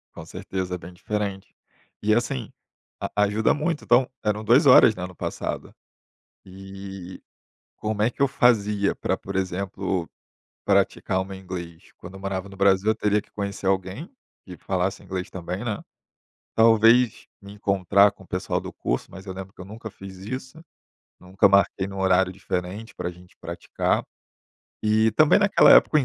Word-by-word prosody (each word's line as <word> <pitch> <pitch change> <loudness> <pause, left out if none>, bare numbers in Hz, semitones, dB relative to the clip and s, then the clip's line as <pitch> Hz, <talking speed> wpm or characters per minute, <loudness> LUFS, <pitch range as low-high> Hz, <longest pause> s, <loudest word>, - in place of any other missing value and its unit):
Com - - -9
certeza, 95 -1 -4
é - - -4
bem 90 +1 -11
diferente. 100 +1 -4 0.5
E 110 - +3
assim, 110 - -1 0.5
a 105 - 0
ajuda 105 +2 +2
muito, 155 +1 -2
então 125 +1 +4 0.2
eram 105 0 -1
2 125 +7 +5
horas, 115 -4 +8
né, 90 - -4
no 90 - -14
passado. - - -5 0.7
E, 95 -1 -9 0.6
como 105 -1 -1
é 120 - +2
que 135 - -8
eu 140 - +5
fazia 105 -6 +2
pra, - - -1
por 100 0 -8
exemplo, 95 -1 -2 0.6
praticar 95 - +1
o - - -4
meu 95 0 -8
inglês, 90 -3 -8
quando - - -11
eu - - -9
morava 95 0 -4
no 95 - -12
Brasil, 100 +1 +3
eu 110 - +3
teria 105 -1 +1
que - - -27
conhecer 100 -2 -4
alguém 95 - -1 0.4
que 90 - -9
falasse 95 0 -2
inglês 95 -1 -5
também, 90 +4 -5
né. 110 -3 -3 0.7
Talvez 115 +1 +4 0.2
me 100 0 -11
encontrar 100 0 +3
com 95 - -17
o - - -20
pessoal 90 - -2
do - - -8
curso, - - -3
mas 95 +1 -11
eu 95 - -6
lembro 95 0 -8
que - - -17
eu - - -7
nunca 110 +2 -8
fiz 95 -1 -11
isso. 130 +9 -7 0.6
Nunca 95 +2 +3
marquei 100 -1 +3
num 95 0 -7
horário 95 0 +3
diferente, 95 +3 -5
para - - -4
a - - -6
gente 90 +1 -18
praticar. - - -2 0.8
E, 110 +1 +3
também 155 +7 +5
naquela 205 -1 +6
época, 155 - +6
o - - +6
100 Hz, 175 wpm, -24 LUFS, 95-110 Hz, 0.8 s, horas